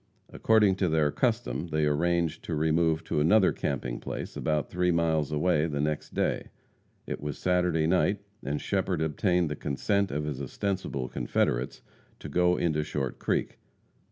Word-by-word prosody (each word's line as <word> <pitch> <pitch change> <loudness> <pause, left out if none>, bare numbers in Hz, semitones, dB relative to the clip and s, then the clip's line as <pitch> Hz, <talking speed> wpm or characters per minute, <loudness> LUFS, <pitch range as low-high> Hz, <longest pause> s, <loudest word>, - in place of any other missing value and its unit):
According 105 -4 +3
to 95 -3 +1
their 80 -2 +2
custom 115 - -1
they 75 -2 0
arranged 85 +2 +1
to 80 - -2
remove 80 +1 +2
to - - -1
another 95 +6 +5
camping 65 -3 -3
place - - -6
about 75 -2 0
three 90 0 +1
miles 80 -3 +1
away 75 +1 +2
the 75 -3 -3
next 75 0 -2
day. - - 0 0.6
It - - -5
was 75 -1 -4
Saturday 90 -3 +1
night, 95 +4 +2 0.3
and 70 +2 -2
Shepherd 95 -4 -1
obtained 90 +3 +1
the 75 - -3
consent 100 +9 0
of 75 +2 -2
his 70 -3 -4
ostensible 70 -3 -3
confederates - - -1 0.3
to - - -8
go 90 +4 +3
into 80 -3 +1
Short 70 -4 -3
Creek. - - -1
80 Hz, 155 wpm, -28 LUFS, 75-90 Hz, 0.6 s, another